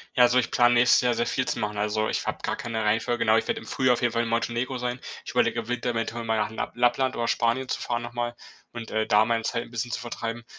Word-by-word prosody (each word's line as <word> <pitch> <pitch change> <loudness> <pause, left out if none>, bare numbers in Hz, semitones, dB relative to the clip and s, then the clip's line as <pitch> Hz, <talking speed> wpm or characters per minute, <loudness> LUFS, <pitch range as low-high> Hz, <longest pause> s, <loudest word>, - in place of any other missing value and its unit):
Ja, 125 - +4
also 120 +1 +4
ich 125 - +1
plane 120 0 +4
nächstes 120 +1 +5
Jahr 125 -1 +2
sehr 120 +1 0
viel 130 - -1
zu - - -1
machen. 105 -2 -3
Also 105 +1 0
ich - - -2
habe - - -1
gar - - -1
keine 110 -1 -3
Reihenfolge, 115 +3 +1
genau. 110 0 +5
Ich - - -1
werde - - -1
im - - -12
Frühjahr 130 +2 +2
auf 120 - -2
jeden 120 -1 +2
Fall 115 - +1
in 115 - -2
Montenegro 120 +3 -1
sein. 125 0 -3 0.3
Ich - - -6
überlege 120 -1 +2
eventuell, 125 +2 -2
im 115 - -2
Winter 115 +1 -3
mal 110 -1 0
nach 105 0 -1
Lapp 110 - -5
Lappland 125 +2 +2
oder 120 0 -1
Spanien 120 +4 +1
zu - - -3
fahren 120 0 -2
noch 120 0 -7
mal 120 0 -3 0.4
und, 115 -1 -7
äh, 110 0 0
da 105 +1 +5
meine 115 0 0
Zeit 115 +1 -1
'n - - -15
bisschen 120 +1 -3
zu - - -2
vertreiben 115 0 -5
120 Hz, 290 wpm, -26 LUFS, 115-120 Hz, 0.4 s, nächstes